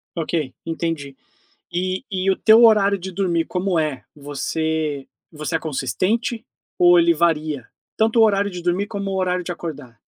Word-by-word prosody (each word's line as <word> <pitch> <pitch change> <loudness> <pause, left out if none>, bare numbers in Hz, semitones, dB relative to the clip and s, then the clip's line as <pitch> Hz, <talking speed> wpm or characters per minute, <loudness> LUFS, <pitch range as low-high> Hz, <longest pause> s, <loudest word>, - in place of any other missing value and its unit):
Ok, 160 -4 -2
entendi. 165 -4 -3 0.6
E 185 +4 -2
e 190 0 0
o - - +1
teu 225 +2 +6
horário 205 -3 +5
de 190 +1 -7
dormir, 175 -3 0
como 180 -1 -1
é? 150 -5 -2
Você 150 0 -3 0.2
você 155 +1 -4
é - - +1
consistente 185 - -1 0.4
ou 175 0 +7
ele 170 0 +5
varia? 155 -5 0 0.3
Tanto 225 +1 +2
o - - +8
horário 200 -1 +2
de 180 -2 -7
dormir 180 +4 0
como 200 -2 -4
o - - -2
horário 180 -1 0
de 175 - -5
acordar. 145 -9 -8
175 Hz, 165 wpm, -21 LUFS, 155-195 Hz, 0.6 s, o